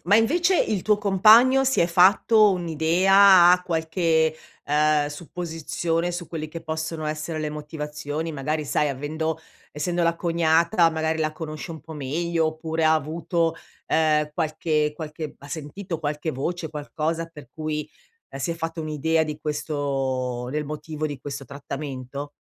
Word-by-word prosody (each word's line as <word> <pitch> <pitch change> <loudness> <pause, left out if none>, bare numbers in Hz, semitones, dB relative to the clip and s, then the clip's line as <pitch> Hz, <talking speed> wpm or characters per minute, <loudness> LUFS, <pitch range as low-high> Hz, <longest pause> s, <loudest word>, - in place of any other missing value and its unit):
ma 200 +5 +4
invece 340 +10 +3
il 200 -4 0
tuo 210 -1 +2
compagno 220 +7 +6
si 265 0 +1
è 170 - +4
fatto 200 +5 +5
un'idea, 180 +2 +5
ha 180 0 +2
qualche, 160 -1 +1 0.3
ehm, 150 0 +2
supposizione 165 +2 -3
su 175 0 -5
quelli 155 -2 -5
che 165 +1 -7
possono 160 0 -4
essere 155 +1 -3
le 155 -1 -2
motivazioni? 150 +1 -5
Magari 150 +2 -2
sai, 150 +1 +1
avendo 155 +4 -3 0.4
essendo 175 +4 -1
la 170 0 +2
cognata 170 +1 +3
magari 160 0 -1
la 155 -1 0
conosce 155 +1 -7
un 160 - -7
po' 160 - -11
meglio 160 +3 -1
oppure 160 +1 -3
ha 155 - +5
avuto, 165 +2 -1 0.3
ehm, 150 -1 +2
qualche 155 -2 0
qualche 155 -1 -6
ha 140 - -13
sentito 165 +3 -6
qualche 150 +1 -2
voce, 160 +5 -3
qualcosa 155 +2 -3
per 150 -6 -13
cui, 155 -1 -3 0.4
ehm, 135 - -8
si 170 - -1
è 165 - -2
fatta 165 0 -4
un'idea 160 +1 0
di 150 -1 -4
questo 135 -5 -2
del 150 +2 -2
motivo 155 +1 -4
di 145 -3 -6
questo 140 -1 -6
trattamento? 140 0 -6
160 Hz, 150 wpm, -24 LUFS, 150-170 Hz, 0.4 s, compagno